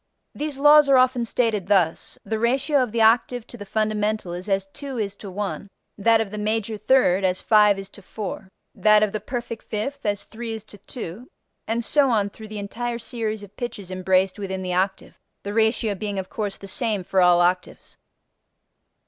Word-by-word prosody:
These 295 -2 -4
laws 295 0 +7
are 270 - +6
often 255 -1 +3
stated 225 -5 0
thus: 185 -5 +1
the 220 -1 -2
ratio 265 +5 +2
of 250 -4 -1
the 230 0 +2
octave 235 +1 +3
to - - -10
the 205 -3 -9
fundamental 215 -3 -1
is 180 +3 -6
as 195 0 +1
two 275 -3 -7
is 200 -3 -2
to 200 - -9
one; 200 +1 -4 0.3
that 225 +2 +3
of 220 -3 -2
the 210 - -5
major 215 +1 -1
third 210 -4 +3
as 185 -1 +1
five 210 -2 +4
is 195 0 -6
to 200 - -14
four; 195 -1 -6 0.2
that 215 0 +4
of 210 - +1
the 215 - -3
perfect 235 +1 -5
fifth 275 +7 -4
as 205 -1 -1
three 225 0 -6
is 220 -2 -6
to 210 -2 -14
two, 230 +1 -8 0.4
and 230 +1 -1
so 285 +1 +3
on 210 -4 +1
through 220 +2 -11
the 215 0 -7
entire 235 +4 -4
series 225 -3 -4
of 205 0 -13
pitches 205 -6 -6
embraced 185 +1 +1
within 190 -1 -4
the 180 -1 -2
octave, 190 +2 -2 0.2
the 205 - -4
ratio 220 -1 +2
being 200 +1 -4
of 190 -1 -5
course 205 -3 -3
the - - -11
same 215 -2 -1
for 190 +1 +1
all 175 -1 +5
octaves. 180 +1 -1
215 Hz, 200 wpm, -23 LUFS, 195-235 Hz, 0.4 s, laws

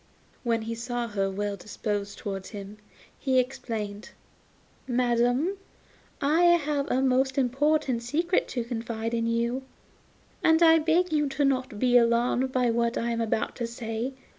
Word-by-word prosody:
When 230 -2 0
he 230 +1 -4
saw 240 +1 -3
her 195 -2 -1
well 205 +1 -2
disposed 205 +1 -4
towards 195 -2 -5
him, 205 -1 -8 0.4
he 265 -2 +1
exclaimed: 225 -5 -2 0.8
'Madam, 245 +8 +1 0.6
I 310 +5 +3
have 295 -2 -2
a 260 +1 +1
most 265 +1 +2
important 270 0 +1
secret 330 +9 0
to 245 - -3
confide 230 -1 -4
to 235 - 0
you, 235 +2 0 0.8
and 320 +1 +5
I 325 0 +7
beg 330 +2 +2
you 295 -2 +2
not 265 -2 +2
to - - -11
be 245 +3 +4
alarmed 240 +2 +2
by 250 -2 +2
what 235 0 0
I 235 0 -1
am 230 0 -1
about 220 -1 -1
to 235 - -2
say. 230 +2 -4
240 Hz, 150 wpm, -27 LUFS, 230-270 Hz, 0.8 s, I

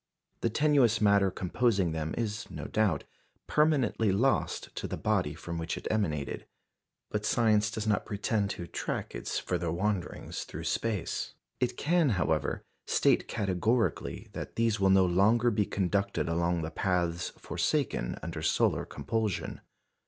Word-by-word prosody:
The 115 - +1
tenuous 130 -3 +3
matter 100 -2 +4
composing 95 0 +1
them 80 0 -3
is, 110 -2 -3
no - - -6
doubt, 105 -9 +1 0.4
permanently 135 -9 +2
lost 125 +8 0
to - - -3
the - - -4
body 90 -8 0
from 85 0 -5
which 80 0 -3
it - - -5
emanated; 80 -10 -1 0.6
but 105 0 -1
science 105 -2 +3
does 110 -1 -4
not 105 -1 +1
pretend 105 0 0
to 85 - -4
track - - -4
its - - -3
further 85 -2 -1
wanderings 95 0 -2
through - - -7
space. 110 -6 -2 0.2
It 125 -1 0
can, 165 -1 +3
however, 80 -4 0 0.2
state - - +3
categorically 110 +4 0
that - - -6
these 115 -2 +1
will 95 -1 +4
no 95 -1 +6
longer 110 +7 +4
be 105 -2 +1
conducted 100 +1 0
along 85 0 0
the 80 - -4
paths 85 -1 0
forsaken - - -1
under - - -4
solar - - +2
compulsion. 105 +7 -2
100 Hz, 145 wpm, -30 LUFS, 85-115 Hz, 0.6 s, no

